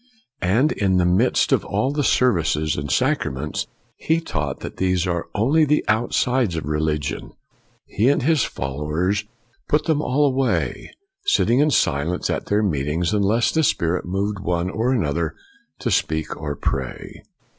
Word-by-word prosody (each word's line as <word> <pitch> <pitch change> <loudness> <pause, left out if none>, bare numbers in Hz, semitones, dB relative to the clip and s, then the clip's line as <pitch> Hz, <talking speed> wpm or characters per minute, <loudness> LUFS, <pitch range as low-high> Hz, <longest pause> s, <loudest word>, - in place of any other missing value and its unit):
And 115 - +2
in 95 -2 +1
the 90 - +3
midst 95 +8 +2
of - - +3
all 105 +7 -1
the 145 0 -1
services 85 - +2
and 70 0 -4
sacra 130 - +1
ments, 70 +4 -4 0.3
he 160 +1 +1
taught 75 - -4
that - - -7
these 95 -1 +1
are 85 -2 -2
only 140 +10 +3
the 150 0 +2
outsides 120 -1 +1
of 80 - -3
religion; 75 -1 -2 0.5
he 115 +6 +1
and 140 - +2
his 155 -2 +3
followers 75 +9 -2
a88 - - -5
FOX - - -35 0.4
put 150 - +2
them 155 -2 +1
all 145 +1 +2
away, 135 -1 0 0.4
sitting 135 - +3
in 150 +1 +4
silence 80 - 0
at - - -3
their 105 +1 +2
meetings 80 +1 0
unless 105 +3 +2
the 160 - +2
Spirit 85 - +1
moved 100 +3 -2
one 90 -1 -1
or 115 +5 0
another 80 - -1 0.4
to - - -2
speak 80 0 0
or 75 -1 -4
pray. 65 -2 -4
95 Hz, 165 wpm, -22 LUFS, 80-125 Hz, 0.5 s, in